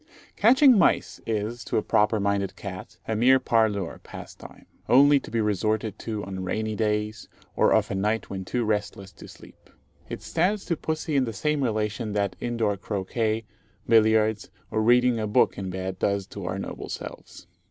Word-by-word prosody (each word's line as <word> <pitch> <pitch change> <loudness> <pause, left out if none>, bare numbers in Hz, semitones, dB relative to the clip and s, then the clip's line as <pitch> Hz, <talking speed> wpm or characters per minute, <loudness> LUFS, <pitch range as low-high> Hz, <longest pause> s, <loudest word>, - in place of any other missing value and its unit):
Catching 255 +1 +6
mice - - +1
is, 115 +2 -2
to - - -1
a 110 - +1
proper 105 +1 +2
minded 100 -1 -1
cat, 95 -2 -8
a 110 - -1
mere 130 +4 +5
parlour 110 -7 0
pastime, - - -11 0.2
only 140 +3 +6
to - - -11
be 115 - -1
resorted 105 0 -1
to 110 -3 -4
on 95 -1 -5
rainy 110 +4 -2
days, 105 0 -2 0.3
or - - +3
of - - +2
a - - -1
night 105 +3 -1
when 95 -1 -5
too 120 +6 -2
restless 105 -2 -2
to - - -13
sleep. - - -16 0.4
It - - -6
stands 190 +5 0
to 170 - 0
pussy 155 -1 -3
in 135 -2 +3
the 115 - -5
same 150 +7 -1
relation 110 -1 -2
that 100 -2 -1
indoor 115 -4 -1
croquet, 110 +3 -2 0.4
billiards, 110 -1 +3 0.2
or 110 0 0
reading 120 +1 +4
a 110 - -2
book 105 - +3
in 95 -1 -5
bed 95 0 -5
does 100 -1 0
to 100 -3 -7
our 90 +2 -3
noble 95 - -6
selves. - - -8
110 Hz, 175 wpm, -25 LUFS, 100-120 Hz, 0.4 s, Catching